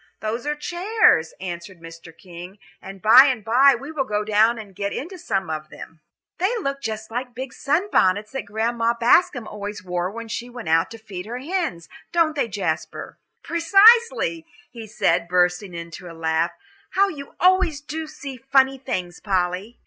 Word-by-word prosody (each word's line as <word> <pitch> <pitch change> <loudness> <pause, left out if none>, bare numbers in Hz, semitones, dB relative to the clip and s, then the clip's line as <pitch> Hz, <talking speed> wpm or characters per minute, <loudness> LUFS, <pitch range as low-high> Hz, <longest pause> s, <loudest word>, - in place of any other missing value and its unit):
"Those 230 +5 -4
are 295 - 0
chairs," 350 - +2
answered 175 0 -7
Mr. 165 0 -12
King, 180 +1 -11 0.2
"and 195 0 -11
by 235 +5 +9
and 250 -6 -1
by 260 +5 +5
we 275 +6 -8
will 300 -4 -1
go 210 -3 -2
down 215 +2 +3
and 210 -3 -10
get 200 +1 -3
into 355 +6 -6
some 195 -9 -2
of 155 0 -5
them." 160 +1 -12 0.4
"They 395 +7 +1
look 275 -9 -3
just 220 -1 -5
like 245 +3 -3
the 245 - -30
big 255 0 -7
sunbonnets 215 - +1
that 270 -5 -5
Grandma 230 +2 0
Bascom 240 -1 +3
always 205 -1 -7
wore 180 0 -2
when 230 +3 -8
she 235 +2 -5
went 240 -8 -7
out 165 +1 +3
to 230 - -9
feed 200 -4 -8
her 240 +2 -5
hens, 310 - -3 0.2
don't 330 -3 +2
they, 280 - 0
Jasper?" 205 -2 -4 0.2
"Precisely," 395 0 +4 0.2
he 230 -3 -9
said, 170 -4 0
bursting 180 +1 +1
into 170 +1 -8
a 165 - -13
laugh. 165 +1 0 0.4
"How 395 +1 +3
you 285 -7 -9
always 365 -4 +3
do 315 +2 -6
see 280 -3 -8
funny 270 +1 +2
things, 180 -10 -4
Polly." 190 +3 -2
230 Hz, 175 wpm, -22 LUFS, 185-280 Hz, 0.4 s, by